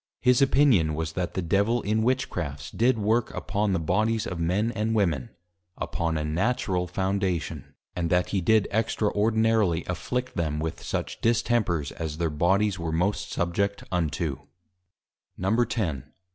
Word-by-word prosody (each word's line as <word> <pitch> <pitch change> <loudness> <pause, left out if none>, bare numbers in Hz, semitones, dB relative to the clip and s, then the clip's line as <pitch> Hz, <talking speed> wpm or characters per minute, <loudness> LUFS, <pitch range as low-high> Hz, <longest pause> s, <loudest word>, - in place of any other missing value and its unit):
His 125 0 +4
Opinion 130 - +4
was, 80 0 -2
that 90 0 -3
the 95 - -1
Devil 100 +7 +1
in 110 +2 +1
Witchcrafts, 85 - -2
did 120 +2 +2
Work 110 +3 +1
upon 105 0 -1
the 90 - +1
Bodies 110 +7 +1
of 90 - -4
Men 95 +7 +1
and 110 0 -1
Women, 80 - +1 0.5
upon 80 -1 -2
a 75 - -2
Natural 90 +1 0
Foundation; 95 -2 -2 0.2
and 85 -2 -1
that 90 +1 +2
he 95 - 0
did 110 +3 +3
Extraordinarily 110 -3 +1
afflict 125 +8 -3
them, 75 -3 -1
with 80 0 -4
such - - -4
Distempers 110 - +1
as 80 -2 -5
their 85 -2 0
Bodies 95 +6 +2
were 85 -1 -2
most 100 +5 -1
subject 100 +3 -1
unto. 80 -4 -1 1.0
_X. 100 - 0
95 Hz, 145 wpm, -26 LUFS, 85-110 Hz, 1.0 s, His